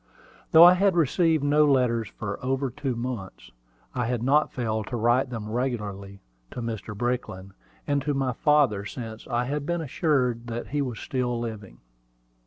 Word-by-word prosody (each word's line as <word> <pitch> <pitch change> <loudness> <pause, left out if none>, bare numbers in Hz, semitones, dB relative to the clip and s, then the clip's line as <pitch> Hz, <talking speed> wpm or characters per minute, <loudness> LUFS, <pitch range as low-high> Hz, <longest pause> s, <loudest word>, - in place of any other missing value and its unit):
Though 160 - +9
I 175 +1 +10
had 190 0 +2
received 165 -1 +2
no 145 +1 +4
letters 125 -6 +2
for 100 0 -5
over 135 0 -1
two 130 -1 -3
months, 120 -5 -6 0.4
I 120 -2 -1
had 120 -1 -2
not 145 +4 +3
failed 110 -3 -2
to 125 - -4
write 120 +3 +2
them 115 -4 -5
regularly 105 -5 -4 0.3
to - - -8
Mr. 110 -2 -5
Brickland, 120 -6 -3 0.3
and 145 -1 0
to 145 +1 -1
my 135 -2 0
father 145 -8 +2
since 110 +1 -8
I 120 -1 0
had 145 +2 -2
been 175 +3 -1
assured 125 -6 0
that 120 0 -5
he 145 +1 -1
was 125 -4 -3
still 125 -2 -2
living. 110 - -7
125 Hz, 170 wpm, -26 LUFS, 115-140 Hz, 0.4 s, I